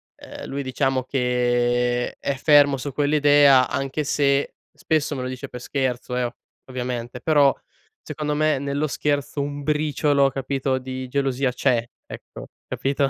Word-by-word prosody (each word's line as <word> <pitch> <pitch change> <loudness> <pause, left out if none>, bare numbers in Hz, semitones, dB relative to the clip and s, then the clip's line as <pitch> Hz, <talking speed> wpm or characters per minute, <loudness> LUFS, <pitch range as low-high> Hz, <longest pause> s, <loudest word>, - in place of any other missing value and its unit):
uhm, - - -10
lui 140 +1 -4
diciamo 130 0 0
che 125 -1 0
è 140 - -2
fermo 145 0 +5
su 135 +2 -5
quell'idea 145 -2 +5
anche 135 +2 -2
se, 140 0 +1 0.2
spesso 155 -2 -1
me 130 - -4
lo - - -3
dice 130 0 -6
per 125 - -8
scherzo, 125 -1 -2
eh, 125 - 0
o 120 -1 -3 0.4
ovviamente 125 -1 -4
però 145 -2 +4 0.5
secondo 150 -1 -4
me 155 -1 +2
nello 140 +2 -2
scherzo 145 0 -1
un 145 0 -4
briciolo 150 -1 +2
capito 135 0 -2
di 130 0 -6
gelosia 135 -1 0
c'è 120 -1 +1 0.2
ecco - - -10 0.2
capito? 135 0 -1
135 Hz, 145 wpm, -23 LUFS, 125-145 Hz, 0.5 s, fermo